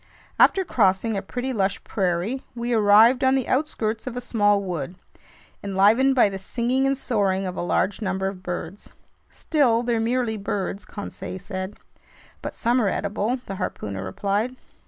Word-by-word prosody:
After 385 -1 +5
crossing 210 - +2
a 195 - -1
pretty 250 +6 -4
lush 195 -3 -1
prairie, 190 +6 -1
we 240 0 -2
arrived 220 +4 +6
on 260 0 +4
the 265 -3 0
outskirts 235 -6 -1
of 250 -1 -4
a - - 0
small 205 -4 +2
wood, 175 -3 -4 0.7
enlivened 210 +7 +4
by 245 - +6
the 195 -1 -5
singing 250 +6 0
and 275 0 +1
soaring 200 -7 0
of 180 -1 -4
a - - -3
large 185 +4 0
number 190 -1 -1
of 195 -1 -6
birds. 180 +1 -6 0.4
"Still, 245 -7 +1
they're 235 -1 0
merely 230 -1 0
birds," 200 0 -3
Conseil 205 -2 -7
said. 190 +1 -6 0.6
"But - - -6
some 240 +2 +2
are 205 - +2
edible," 210 +6 -1
the 195 - -6
harpooner 100 - -4
replied. 200 - -1
210 Hz, 160 wpm, -24 LUFS, 190-245 Hz, 0.7 s, arrived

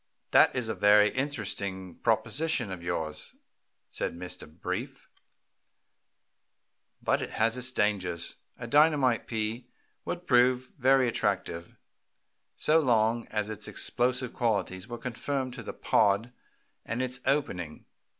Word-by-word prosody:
"That - - +6
is 125 -3 0
a 110 - -1
very 105 0 +5
interesting 100 - -3
proposition 150 -9 +1
of 90 -2 -6
yours," 80 -3 -4 0.5
said - - -3
Mr. 90 -3 -7
Brief, 80 - -5 2.0
"but - - +2
it - - -4
has 115 +1 +1
its 125 +1 -1
dangers. 95 -7 -1 0.2
A - - -7
dynamite 140 -2 +3
pea 115 +2 -3 0.4
would 175 0 -5
prove 125 0 +3
very 130 -1 +4
attractive 90 -6 -2 0.8
so 155 +1 +4
long 115 -4 +2
as 105 0 -2
its 110 - -5
explosive 125 0 0
qualities 100 -4 -1
were 120 -1 -6
confined 130 +2 -3
to 125 - -7
the 110 - -6
pod 110 +3 +2 0.5
and 120 +3 -2
its 130 0 -3
opening. 90 - -1
115 Hz, 120 wpm, -29 LUFS, 100-130 Hz, 2.0 s, That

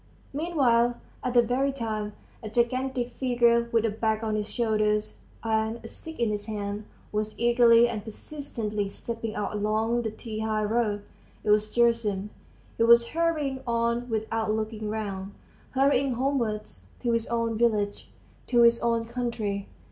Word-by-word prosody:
Meanwhile, 260 -7 +2 0.3
at 250 -1 -2
that 240 -1 +6
very 265 +4 +1
time, 215 -5 -3 0.3
a 215 - -6
gigantic 245 +2 0
figure 235 -2 +2
with 230 -1 +3
a 225 - +1
bag 220 +1 0
on 220 -1 -1
his 215 0 -2
shoulders 215 -2 0 0.3
and 220 0 0
a - - -7
stick 320 +7 -9
in 230 -3 +2
his 205 0 -4
hand, 205 -1 -4 0.3
was 215 0 -2
eagerly 235 0 +6
and 220 -3 -4
persistently 220 -4 -4
stepping 225 +1 -5
out 210 - -2
along 215 +3 +1
the 225 - -2
T 220 0 -7
high 215 -1 0
road. 210 -1 0 0.4
It 210 - +2
was 210 0 +3
Gerasim. 230 -4 +2 0.5
He - - +5
was 235 0 +6
hurrying 310 -5 0
on 235 +1 0
without 220 0 -1
looking 215 0 -2
round; 200 -2 -4 0.3
hurrying 275 0 +2
homewards, 235 -5 -2 0.2
to 240 - +2
his 230 -1 0
own 230 -1 0
village, 215 -3 0 0.4
to 240 -2 +5
his 235 0 +6
own 230 -1 +1
country. 230 -4 -3
230 Hz, 155 wpm, -27 LUFS, 215-240 Hz, 0.5 s, that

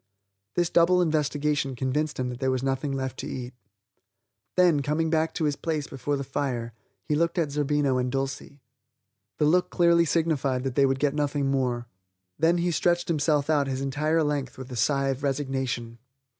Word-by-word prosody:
This 175 -1 +1
double 175 +2 +4
investigation 150 -4 0
convinced 140 +4 -1
him 125 -1 -1
that 125 -1 -6
there 130 - 0
was 130 0 -1
nothing 135 +1 -1
left 130 -1 -3
to - - -4
eat. 125 -1 -6 1.0
Then, 175 -5 +4
coming 155 +3 0
back 160 0 +1
to 165 - -1
his 145 -2 +1
place 155 -1 -2
before 140 +2 -3
the 140 - -3
fire, 125 -4 -3 0.3
he - - -2
looked 170 +3 +1
at 160 -4 +1
Zerbino 145 -2 +1
and 125 0 -1
Dulcie. 135 +1 -4 0.7
The 150 - +2
look 180 +4 +3
clearly 170 -1 +4
signified 150 -6 0
that 135 -2 -2
they 140 +1 +4
would 135 0 +1
get 140 0 +1
nothing 145 -2 0
more; 125 -3 0 0.5
then 165 +3 +3
he 175 0 +1
stretched 175 +1 +1
himself 150 -2 +1
out 145 -3 +2
his 135 0 -2
entire 150 +4 +1
length 145 -4 -2
with 130 0 -9
a - - -5
sigh 135 +4 +1
of 135 0 -2
resignation. 130 -4 -2
145 Hz, 185 wpm, -26 LUFS, 130-155 Hz, 1.0 s, double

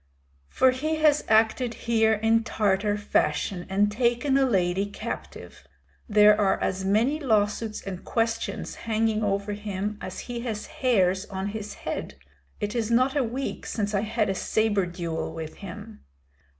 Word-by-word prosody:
"For 260 - +4
he 305 +5 -1
has 305 -1 +3
acted 225 +2 +3
here 225 -1 +3
in 225 +1 +2
Tartar 205 -1 +1
fashion 180 -2 0
and 205 +2 +2
taken 240 +4 +1
a 270 -1 +4
lady 190 -2 +1
captive. 205 - -7 0.5
There 210 0 +7
are 195 -2 +2
as 190 0 -1
many 225 +10 +2
lawsuits 215 -4 0
and 185 -2 -6
questions 225 -1 -2 0.2
hanging 220 0 +1
over 200 0 -1
him 205 0 -4
as 185 - -6
he 240 -1 -5
has 225 -3 -4
hairs 190 -6 +1
on 190 0 -4
his 210 0 -6
head. - - -4 0.4
It 210 0 -2
is 230 -3 -1
not 255 +4 +3
a 285 - +2
week 250 +4 -4
since 210 -1 -2
I 200 - +2
had 220 0 0
a 195 - 0
sabre 205 -1 +1
duel 170 -2 -4
with 160 -1 -7
him." 70 - -10
215 Hz, 155 wpm, -26 LUFS, 200-235 Hz, 0.5 s, There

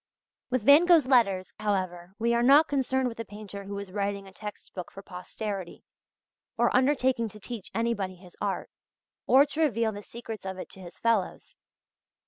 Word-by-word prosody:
With 255 -3 0
Van 285 +8 +7
Gogh's 335 -6 +6
letters, 200 -8 +3
however, 185 -3 -2
we 235 +2 +1
are 235 - +2
not 280 +6 +6
concerned 265 -2 0
with 230 -2 -6
a - - -2
painter 205 -1 -9
who 200 0 -5
is 200 -2 -7
writing 200 0 -2
a 190 - -14
text 210 +1 -9
book 180 -2 -7
for 195 - -11
posterity, 190 +1 -6 0.7
or - - +2
undertaking 255 -3 +2
to 210 - -13
teach 220 -1 -7
anybody 225 -5 -1
his 180 -1 -16
art, - - -2 0.6
or 270 +2 +7
to 305 +2 -4
reveal 230 -7 +2
the 205 -1 -7
secrets 225 0 -8
of 190 -1 -5
it 185 - -8
to - - -12
his 175 -1 -11
fellows. 225 -5 -1
215 Hz, 180 wpm, -28 LUFS, 195-250 Hz, 0.7 s, Van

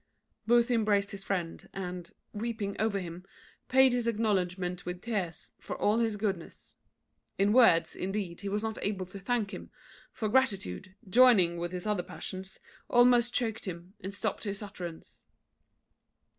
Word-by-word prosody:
Booth 240 +1 +4
embraced 210 -4 +2
his 195 -1 -6
friend, 180 -5 -3
and, 180 -2 -5 0.2
weeping 215 -2 -3
over 215 -1 +1
him, 175 -1 -7 0.5
paid 265 -1 +6
his 245 -1 0
acknowledgment 185 -5 0
with 180 0 -5
tears 190 -6 -3
for - - -6
all 210 +3 +2
his 225 -3 +1
goodness. 195 -5 -4 0.6
In 200 +2 +3
words, 225 -9 +5
indeed, 190 -2 -3
he 200 - -3
was 210 +2 -1
not 220 -1 -3
able 195 -2 -2
to 185 +2 -10
thank 215 0 -1
him; - - -7 0.4
for 220 -4 -2
gratitude, 195 - 0
joining 190 -6 +6
with 175 0 -3
his 180 +1 -5
other 210 -4 +1
passions, 190 +1 -7 0.3
almost 245 -1 +5
choaked 225 -3 -1
him, 180 0 -7
and 190 - -5
stopt 205 +1 -2
his 205 -1 -4
utterance. 180 -5 -8
200 Hz, 150 wpm, -30 LUFS, 180-225 Hz, 0.6 s, paid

